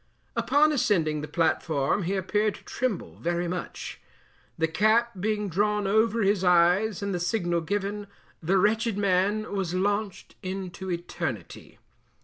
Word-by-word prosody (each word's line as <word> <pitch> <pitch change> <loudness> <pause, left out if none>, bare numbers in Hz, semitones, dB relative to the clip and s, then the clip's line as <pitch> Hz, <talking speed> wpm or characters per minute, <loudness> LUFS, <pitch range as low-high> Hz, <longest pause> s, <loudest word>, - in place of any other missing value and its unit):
Upon 300 +2 +3
ascending 175 - +1
the 150 - -5
platform 160 -1 +1
he 190 +2 -1
appeared 210 +3 0
to - - -15
tremble 245 -7 -3
very 175 +1 -1
much. 180 +1 -5 0.6
The 160 - +2
cap 215 +8 +3
being 210 +1 -1
drawn 205 +3 +1
over 220 +2 +2
his 195 -1 +2
eyes 180 +4 +3
and 200 -1 -2
the 180 - -1
signal 175 -2 0
given, 205 +3 -3 0.3
the 180 +4 +2
wretched 215 +2 +2
man 200 +2 +1
was 185 -3 -2
launched 205 +1 -1
into 190 -1 -5
eternity. 170 - -5
195 Hz, 135 wpm, -27 LUFS, 175-210 Hz, 0.6 s, Upon